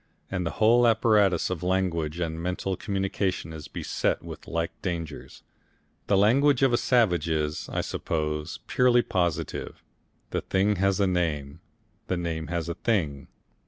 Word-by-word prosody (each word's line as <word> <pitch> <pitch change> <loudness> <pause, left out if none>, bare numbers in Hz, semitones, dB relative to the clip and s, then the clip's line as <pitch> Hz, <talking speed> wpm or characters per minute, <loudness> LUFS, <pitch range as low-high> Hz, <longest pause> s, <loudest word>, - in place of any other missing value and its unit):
And 90 -3 -1
the - - -5
whole 120 +2 +5
apparatus 105 -6 +3
of 90 -4 -3
language 90 -4 0
and 80 -1 -2
mental 90 +2 -2
communication 95 -3 -2
is 75 -2 -8
beset - - -2
with - - -9
like 85 0 -1
dangers. 85 -4 -5 0.6
The 100 - +3
language 135 +7 +4
of 135 - +5
the 120 - +3
savage 90 - +2
is, 75 -1 -1
I - - -1
suppose, 75 0 -3
purely 125 -1 +4
positive; 85 -4 -2 0.5
the - - -1
thing 100 +2 +1
has 95 +1 +2
a 100 - +4
name, 80 -7 -1 0.5
the 90 - -1
name 80 -2 -3
has 85 -1 -2
a 85 - -2
thing. 80 - -1
90 Hz, 150 wpm, -26 LUFS, 80-100 Hz, 0.6 s, whole